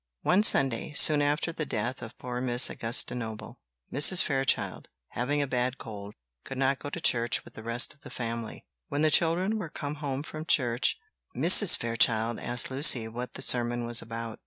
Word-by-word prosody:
"] -, -, -62 dB
One 185 Hz, +3 st, +2 dB
Sunday, 135 Hz, -, +1 dB
soon 150 Hz, 0 st, +6 dB
after 145 Hz, +3 st, -2 dB
the 160 Hz, -, -4 dB
death 120 Hz, -1 st, -5 dB
of 120 Hz, 0 st, -11 dB
poor 125 Hz, 0 st, -7 dB
Miss 125 Hz, -1 st, +3 dB
Augusta 115 Hz, +1 st, 0 dB
Noble, 110 Hz, -3 st, -9 dB, 0.3 s
Mrs. 150 Hz, +6 st, +4 dB
Fairchild, 135 Hz, -2 st, -2 dB, 0.2 s
having 145 Hz, +5 st, -3 dB
a -, -, -5 dB
bad 125 Hz, 0 st, -3 dB
cold, 105 Hz, -2 st, -11 dB, 0.3 s
could 135 Hz, -, -9 dB
not 135 Hz, 0 st, -1 dB
go 145 Hz, -, -8 dB
to 170 Hz, -, -8 dB
church 120 Hz, -7 st, +1 dB
with -, -, -16 dB
the -, -, -12 dB
rest 115 Hz, +3 st, +2 dB
of 140 Hz, -, -27 dB
the -, -, -13 dB
family. 115 Hz, -2 st, -7 dB, 0.2 s
When 145 Hz, +2 st, -3 dB
the 155 Hz, -, +1 dB
children 180 Hz, +8 st, +1 dB
were 175 Hz, -6 st, -7 dB
come 145 Hz, 0 st, -7 dB
home 140 Hz, -1 st, -5 dB
from 155 Hz, 0 st, -10 dB
church, 120 Hz, -6 st, 0 dB, 0.4 s
Mrs. 175 Hz, -, +7 dB
Fairchild 115 Hz, -1 st, 0 dB
asked 120 Hz, +2 st, -1 dB
Lucy 130 Hz, -4 st, +4 dB
what 120 Hz, +3 st, -9 dB
the 135 Hz, -, -3 dB
sermon 120 Hz, -1 st, -1 dB
was 120 Hz, 0 st, +2 dB
about. 115 Hz, 0 st, -9 dB
125 Hz, 190 wpm, -26 LUFS, 115-145 Hz, 0.4 s, Mrs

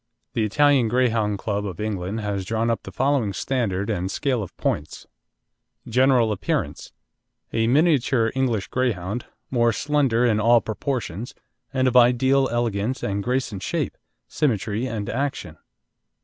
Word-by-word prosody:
The 115 Hz, -, 0 dB
Italian 135 Hz, +3 st, +3 dB
Greyhound 115 Hz, -4 st, +1 dB
Club 100 Hz, 0 st, -2 dB
of 95 Hz, -5 st, -6 dB
England 105 Hz, 0 st, -3 dB
has 100 Hz, -2 st, -2 dB
drawn 115 Hz, +4 st, 0 dB
up 115 Hz, -, -2 dB
the -, -, -9 dB
following 130 Hz, -6 st, +1 dB
standard 100 Hz, -4 st, -1 dB
and 95 Hz, -4 st, -2 dB
scale 130 Hz, +1 st, -1 dB
of 95 Hz, -, -8 dB
points: 75 Hz, +1 st, -3 dB, 0.8 s
GENERAL 125 Hz, -1 st, +3 dB
APPEARANCE 105 Hz, -, -2 dB, 0.6 s
A 115 Hz, 0 st, +1 dB
miniature 130 Hz, -5 st, +3 dB
English 120 Hz, -7 st, 0 dB
Greyhound, 115 Hz, -3 st, -2 dB, 0.2 s
more 120 Hz, -2 st, +3 dB
slender 135 Hz, -2 st, +1 dB
in 110 Hz, -3 st, +2 dB
all 115 Hz, +2 st, +5 dB
proportions, 115 Hz, -2 st, -4 dB, 0.4 s
and 130 Hz, -1 st, +1 dB
of 125 Hz, -, 0 dB
ideal 130 Hz, +2 st, +4 dB
elegance 120 Hz, +1 st, -1 dB
and 100 Hz, 0 st, -1 dB
grace 125 Hz, +2 st, -1 dB
in 100 Hz, -, -5 dB
shape, -, -, -2 dB, 0.3 s
symmetry, 115 Hz, -3 st, -1 dB
and 110 Hz, -5 st, -4 dB
action. 120 Hz, -, -3 dB
115 Hz, 140 wpm, -23 LUFS, 105-130 Hz, 0.8 s, all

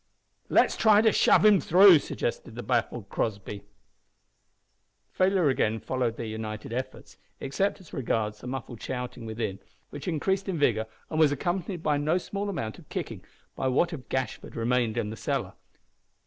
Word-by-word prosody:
"Let's -, -, +4 dB
try 215 Hz, -2 st, +5 dB
to 220 Hz, -, +5 dB
shove -, -, +4 dB
him 210 Hz, -3 st, +6 dB
through," 185 Hz, -1 st, +7 dB
suggested 115 Hz, -4 st, -4 dB
the 120 Hz, -, -6 dB
baffled 120 Hz, -3 st, -1 dB
Crossby. 100 Hz, -2 st, -3 dB, 1.5 s
Failure 185 Hz, -3 st, +2 dB
again 110 Hz, -4 st, +1 dB
followed 125 Hz, -2 st, -2 dB
their 115 Hz, -, -4 dB
united 110 Hz, 0 st, -5 dB
efforts 130 Hz, +2 st, -6 dB, 0.2 s
except 190 Hz, +11 st, -1 dB
as 185 Hz, -, -17 dB
regards 105 Hz, -4 st, -2 dB
the -, -, -8 dB
muffled 125 Hz, -3 st, -6 dB
shouting 125 Hz, -2 st, -5 dB
within, 110 Hz, -3 st, -3 dB, 0.3 s
which 145 Hz, +2 st, -8 dB
increased 190 Hz, +4 st, -1 dB
in 180 Hz, -, -1 dB
vigour 110 Hz, -7 st, +2 dB, 0.2 s
and 155 Hz, -, -1 dB
was 155 Hz, -3 st, +5 dB
accompanied 175 Hz, +4 st, -2 dB
by 150 Hz, -1 st, +2 dB
no 155 Hz, +4 st, +1 dB
small 200 Hz, +2 st, -4 dB
amount 115 Hz, -, -4 dB
of -, -, -18 dB
kicking -, -, -5 dB, 0.3 s
by 130 Hz, -, -1 dB
what 155 Hz, +7 st, +2 dB
of 130 Hz, -6 st, -8 dB
Gashford 130 Hz, -1 st, -3 dB
remained 120 Hz, -1 st, 0 dB
in 110 Hz, -3 st, -1 dB
the -, -, -6 dB
cellar. -, -, -2 dB
130 Hz, 160 wpm, -27 LUFS, 115-175 Hz, 1.5 s, through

